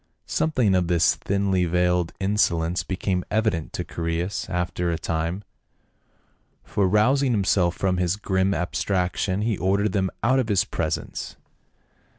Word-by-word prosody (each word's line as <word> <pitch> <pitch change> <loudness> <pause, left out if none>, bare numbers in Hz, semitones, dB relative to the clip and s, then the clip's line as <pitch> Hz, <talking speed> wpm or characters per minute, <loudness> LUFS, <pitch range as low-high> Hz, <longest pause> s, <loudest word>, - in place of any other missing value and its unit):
Something 130 -10 +1
of 90 -2 +2
this 85 -2 +3
thinly 100 -2 0
veiled 90 0 +1
insolence 90 -4 +1
became 95 -1 -2
evident 105 -7 0
to - - -3
Chaereas 85 +3 -3
after 90 -1 -1
a 85 - 0
time, 85 +4 -2 1.2
for 100 -2 0
rousing 125 +7 +3
himself 95 -4 +2
from 95 -1 0
his 90 0 +1
grim 95 -2 0
abstraction 95 +2 -1
he 110 -3 -1
ordered 100 +2 +1
them 95 -2 0
out 130 +3 +3
of 120 -3 -1
his 100 -3 +2
presence. - - -3
95 Hz, 135 wpm, -24 LUFS, 90-105 Hz, 1.2 s, this